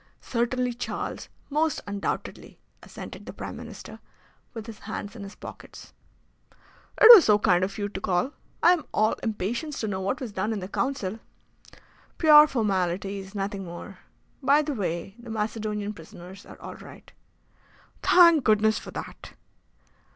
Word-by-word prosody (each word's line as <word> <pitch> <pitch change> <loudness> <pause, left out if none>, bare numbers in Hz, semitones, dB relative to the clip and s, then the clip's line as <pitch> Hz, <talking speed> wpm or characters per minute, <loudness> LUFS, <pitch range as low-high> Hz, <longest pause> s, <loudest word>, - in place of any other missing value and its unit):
"Certainly, 245 +1 -1
Charles, 240 - -5 0.2
most 305 +1 +1
undoubtedly," 200 -1 -5 0.2
assented - - -10
the - - -7
Prime - - -7
Minister, - - -10 0.5
with 225 -3 -8
his 225 -3 -10
hands 210 0 -6
in 225 - -9
his 200 0 -9
pockets. - - -12 1.1
"It - - +9
was 405 -7 +9
so 210 -1 +5
kind 180 -3 +3
of 195 +2 -3
you 205 -1 -2
to 195 -1 -7
call. 185 +11 0 0.3
I 350 - +7
am 340 -4 -3
all 215 +1 +3
impatience 230 - -3
to 220 - -2
know 190 -2 -3
what 200 +8 -2
was 250 -5 -6
done 205 +3 -2
in 215 - -3
the 185 - -6
Council." 220 -2 -2 1.0
"Pure 305 -2 +8
formalities, 195 - -2
nothing 195 0 -3
more. 175 +2 -9 0.4
By 285 +3 +4
the 295 0 -3
way, 180 -4 -3
the 235 0 -11
Macedonian 210 -1 -3
prisoners 180 +3 -12
are - - -13
all - - -8
right." - - -14 0.9
"Thank 335 -5 +6
Goodness 215 0 +3
for - - -11
that!" - - -8
215 Hz, 150 wpm, -26 LUFS, 195-250 Hz, 1.1 s, It